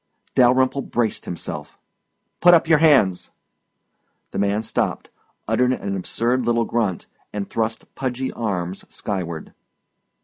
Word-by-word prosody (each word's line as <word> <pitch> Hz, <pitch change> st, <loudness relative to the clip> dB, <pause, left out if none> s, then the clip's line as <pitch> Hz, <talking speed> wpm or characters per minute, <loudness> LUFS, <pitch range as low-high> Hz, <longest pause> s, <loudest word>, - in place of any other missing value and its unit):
Dalyrimple 130 Hz, +2 st, +4 dB
braced 120 Hz, -4 st, -1 dB
himself. 85 Hz, -, -6 dB, 0.6 s
"Put 175 Hz, 0 st, +8 dB
up 165 Hz, -, +2 dB
your 160 Hz, -2 st, +5 dB
hands!" 135 Hz, -, +4 dB, 1.0 s
The -, -, -3 dB
man 100 Hz, +2 st, +1 dB
stopped, -, -, -2 dB, 0.4 s
uttered 125 Hz, 0 st, +2 dB
an 100 Hz, -5 st, -3 dB
absurd 120 Hz, +7 st, 0 dB
little 115 Hz, 0 st, +2 dB
grunt, 110 Hz, -7 st, -1 dB, 0.3 s
and 105 Hz, -1 st, -4 dB
thrust 110 Hz, 0 st, -3 dB
pudgy 130 Hz, 0 st, -3 dB
arms 95 Hz, -5 st, -3 dB
skyward. 85 Hz, -6 st, -4 dB
115 Hz, 115 wpm, -22 LUFS, 100-130 Hz, 1.0 s, Put